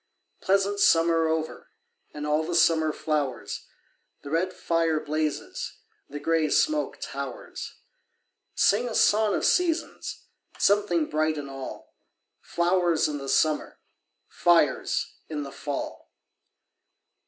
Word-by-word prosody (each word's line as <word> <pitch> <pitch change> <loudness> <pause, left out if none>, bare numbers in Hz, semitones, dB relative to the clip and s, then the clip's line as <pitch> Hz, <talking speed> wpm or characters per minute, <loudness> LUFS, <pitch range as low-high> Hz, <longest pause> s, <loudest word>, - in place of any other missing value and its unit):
Pleasant 200 +1 +1
summer 165 -2 +4
over 160 0 -3 0.4
And 150 0 -6
all 150 +1 +1
the 170 +2 -3
summer 160 -2 +4
flowers, 145 -6 -3 0.6
The 140 - -8
red 175 +3 +1
fire 165 -3 0
blazes, 155 0 -3 0.3
The 145 - -6
grey 160 0 +1
smoke 305 - +1
towers. - - -6 0.8
Sing 235 +5 +3
a 225 - -5
song 210 -1 +4
of - - -1
seasons! 340 -2 0 0.3
Something 195 -6 +2
bright 155 0 0
in 145 -1 -5
all! 135 -1 -8 0.5
Flowers 175 -1 +1
in 150 -1 -3
the 135 0 -6
summer, 155 +1 +1 0.5
Fires 165 -6 +2 0.2
in 150 -2 -3
the 140 - -8
fall! 145 0 -6
160 Hz, 115 wpm, -26 LUFS, 150-185 Hz, 0.8 s, summer